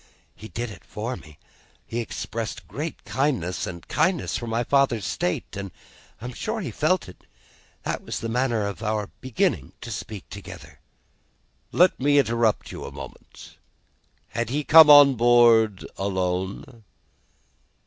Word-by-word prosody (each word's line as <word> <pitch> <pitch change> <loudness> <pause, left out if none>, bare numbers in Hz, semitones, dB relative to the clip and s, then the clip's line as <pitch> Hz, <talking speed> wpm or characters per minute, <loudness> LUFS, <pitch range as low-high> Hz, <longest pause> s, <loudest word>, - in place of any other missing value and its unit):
He 110 - -10
did 115 +3 -5
it - - -12
for 115 +4 -5
me. 75 -8 -14 0.5
He 115 - -4
expressed 115 0 -5
great 155 +3 -6
gentleness 130 - -1
and 85 -1 -8
kindness 185 -3 0
for 120 - -4
my 115 +1 0
father's 130 -6 +2
state, 90 +3 -2
and 100 -1 -5 0.5
I 115 - -9
am 125 - -5
sure - - -3
he 120 - -4
felt 165 - +1
it. 90 - -14 0.6
That - - -3
was - - -4
the 115 - -4
manner 120 -2 0
of 100 +1 -5
our 105 -2 -2
beginning 130 - -1
to 120 - -7
speak 105 -2 -7
together." 90 -7 -10 0.9
"Let 180 +1 +4
me 145 +2 +3
interrupt 115 -4 +1
you - - -7
for - - -6
a - - -8
moment. - - -12 0.7
Had 120 0 -3
he 145 +4 -1
come 160 +1 +8
on 145 -2 +9
board 115 -4 +4
alone?" 95 +4 -3
115 Hz, 150 wpm, -24 LUFS, 100-130 Hz, 0.9 s, on